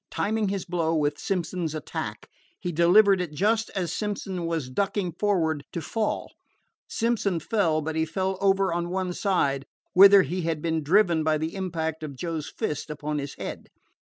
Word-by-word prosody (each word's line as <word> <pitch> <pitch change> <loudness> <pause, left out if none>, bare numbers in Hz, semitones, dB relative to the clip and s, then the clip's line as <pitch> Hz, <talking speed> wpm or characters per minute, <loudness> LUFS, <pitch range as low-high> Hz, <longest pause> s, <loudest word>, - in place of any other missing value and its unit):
Timing 215 -1 0
his 195 -1 -3
blow 165 -2 0
with 145 -1 0
Simpson's 175 -3 -2
attack, 155 - -5 0.3
he 180 - -3
delivered 185 +4 +5
it 170 -4 -4
just 220 +5 +1
as 180 -3 -1
Simpson 195 -4 -3
was 165 -5 -2
ducking 195 +3 -1
forward 165 -5 0
to - - -2
fall. 215 +7 -2 0.5
Simpson 220 -6 0
fell, 165 -4 +1
but 160 +1 -3
he 160 - +2
fell 190 +3 -2
over 195 -2 +3
on 170 0 -2
one 185 0 -2
side, 140 -9 0 0.3
whither 195 +1 +9
he 175 +6 -3
had 165 -2 -1
been 160 0 -1
driven 170 0 +3
by 155 0 +2
the 160 +2 -3
impact 165 -5 -3
of 150 -3 -6
Joe's 160 +1 -4
fist 150 +1 -4
upon 150 0 -3
his 140 -1 -6
head. - - -7
175 Hz, 170 wpm, -26 LUFS, 160-195 Hz, 0.5 s, whither